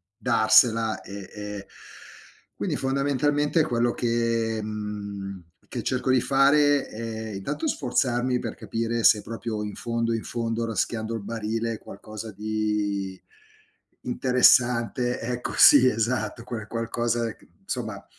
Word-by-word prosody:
darsela 110 +1 +3
e 100 -1 -9
e 105 -1 -7 0.9
quindi - - -2
fondamentalmente 145 +3 +1
quello 120 -4 +1
che, 115 -2 0
mhmm, 100 -2 -5 0.3
che - - -4
cerco 130 0 0
di 130 -1 +4
fare 140 +2 +4
è 110 0 -6
intanto 140 - -3
sforzarmi 125 - 0
per 115 -3 -4
capire 115 0 -2
se 105 - +6
proprio 115 -2 -4
in 105 -1 -5
fondo 115 0 -1
in 115 - -2
fondo, 115 0 -2
raschiando 110 +1 -2
il 110 - -4
barile 115 +1 -3
qualcosa 110 +2 -9
di 105 -2 -2 0.8
interessante 125 -1 +3
ecco 120 +1 -4
sì, 130 -3 +8
esatto. 115 -1 -1
Quel 115 -3 -6
qualcosa 115 0 -1
c - - -23 0.2
insomma, - - -4
115 Hz, 120 wpm, -25 LUFS, 110-125 Hz, 0.9 s, sì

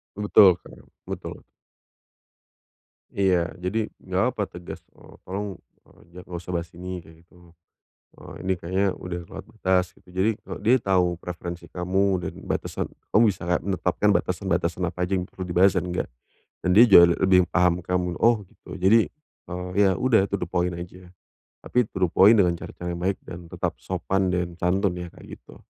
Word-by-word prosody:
Betul 100 -3 +5
betul - - -15 0.3
betul. - - -7 1.7
Iya. 90 -4 +1
Jadi, 105 +4 -2
enggak - - 0
apa - - -3
tegas, 90 0 -9 0.2
eee, - - -17
"Tolong, 100 0 -4 0.3
eee, - - -23
enggak 90 +1 -12
usah 90 +1 -6
bahas 85 0 -5
ini," 90 +1 -7
gitu. 85 +2 -19 0.6
Eee, - - -12
"Ini 95 - +2
kayaknya 95 +3 -1
udah 90 -1 -6
kelewat - - -9
batas," 90 -1 +2
gitu. - - -26
Jadi, 95 +4 +2 0.3
dia 115 +4 +5
tahu 90 -5 +1
preferensi 85 -1 -7
kamu 90 +2 -1 0.2
dan - - -4
batasan - - -3 0.2
kamu 110 +3 +5
bisa 100 -4 -1
enggak 90 +1 0
menetapkan 95 +1 0
batasan-batasan 90 -1 -1
apa 90 +1 -7
aja, 90 +2 -2
yang 90 - -4
perlu 95 - -8
dibahas 90 +2 +3
dan 90 -1 0
enggak. 90 - -2 0.5
Dan 90 0 +1
dia 115 - +9
juga 85 -2 +8
lebih 90 -2 +4
paham 90 -1 +2
kamu. 90 0 -2
"Oh 115 -2 +3
gitu." 95 - -13
Jadi, 105 +5 +4 0.4
eee, 90 0 -5
ya 95 -2 +4
udah 110 -4 +3
to 100 - -1
the 90 -3 -4
point 90 -1 0
aja, 90 +1 -9 0.5
tapi 125 0 +1
to - - -8
the 90 - +3
point 105 +6 +6
dengan 90 -3 +3
cara-cara 90 +1 -6
yang 85 - -7
baik 95 +1 0
dan 85 -1 -9
tetap - - -2
sopan 95 -1 -1
dan 90 -1 -2
santun 90 +2 0
ya, 90 0 -6
kayak - - -12
gitu. - - -17
90 Hz, 175 wpm, -24 LUFS, 90-95 Hz, 1.7 s, dia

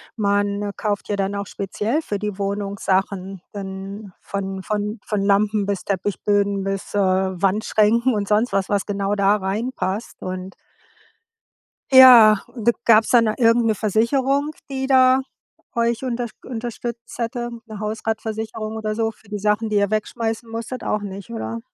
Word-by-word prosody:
man 205 -1 0
kauft 205 -2 -2
ja 205 - +1
dann 195 0 -1
auch 200 - -3
speziell 210 - -2
für 210 -9 -3
die 210 -1 -4
Wohnung 200 0 -3
Sachen 190 -1 -1
dann 195 0 -7
von 195 -1 -4
von 210 +1 -2
von 210 -2 -1
Lampen 205 +1 +2
bis 200 -2 -2
Teppichböden 200 +1 0
bis, 195 +1 -4
äh, 205 - +2
Wandschränken 200 +5 +2
und 205 -1 -2
sonst 215 +4 +2
was 195 -1 0
was 200 -2 0
genau 200 0 -1
da 200 +1 +3
reinpasst, 210 +1 -3
und 185 +1 -6 1.4
Ja, 245 -5 +10 0.3
d - - -7 0.2
gab's 220 -1 +5
dann 235 -2 +5
irgendeine 230 0 +3
Versicherung, 265 +8 +1 0.2
die 265 -1 -2
da 260 -1 +5 0.5
euch 235 +1 0
unterst 240 -2 -3
unterstützt 235 -1 -6
hätte, 240 0 -3 0.2
'ne 215 -3 -9
Hausratversicherung 220 0 -4
oder 215 -1 -2
so 225 +1 0
für 225 -1 -16
die 205 0 -5
Sachen, 210 +2 +1
die 210 - +1
ihr 200 -1 +2
wegschmeißen 225 +2 -2
musstet. 230 +3 -5
Auch 210 - -1
nicht, 195 - -8
oder? 110 0 -4
210 Hz, 150 wpm, -22 LUFS, 200-230 Hz, 1.4 s, Ja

